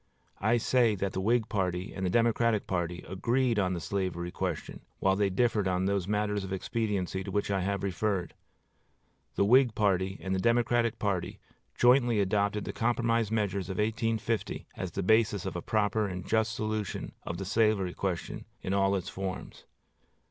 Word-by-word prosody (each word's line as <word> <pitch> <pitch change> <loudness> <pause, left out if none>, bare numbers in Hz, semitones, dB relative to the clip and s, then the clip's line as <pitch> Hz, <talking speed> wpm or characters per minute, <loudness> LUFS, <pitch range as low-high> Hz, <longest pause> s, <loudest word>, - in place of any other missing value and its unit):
I 110 +4 +3
say 120 -2 +3
that 95 0 -2
the 95 - -2
Whig 115 +2 +2
party 95 -3 -2
and 95 - -5
the 90 - +1
Democratic 115 0 +2
party 85 -1 -3
agreed 120 +5 +1
on 95 -2 +1
the 90 - -2
slavery 90 -1 -3
question, 90 -4 -4 0.2
while 95 0 +2
they 100 0 +2
differed 105 0 +1
on 90 0 0
those 100 -2 0
matters 105 -1 0
of 95 - -6
expediency 95 -2 -2
to - - -6
which 105 -1 -1
I 95 -1 +1
have 100 +1 -1
referred. 95 -1 -1 1.0
The 100 - +3
Whig 125 +1 +5
party 95 -2 +1
and 95 - -3
the 95 - 0
Democratic 115 +1 +2
party 100 -4 -2 0.4
jointly 120 -2 +4
adopted 100 +1 +1
the - - -4
compromise 115 -1 +1
measures 100 -4 -1
of 95 - -4
1850 110 +1 -1
as 95 - -4
the 100 - -3
basis 110 -1 +3
of - - -4
a 85 - -3
proper 105 +1 +1
and 90 -2 -5
just 110 0 +1
solution 110 -3 -3
of 85 - -5
the 95 - -4
slavery 105 -3 +2
question 95 -4 -3 0.2
in 95 - -1
all 100 0 +3
its 95 - -3
forms. 95 -1 -6
100 Hz, 175 wpm, -29 LUFS, 95-110 Hz, 1.0 s, Whig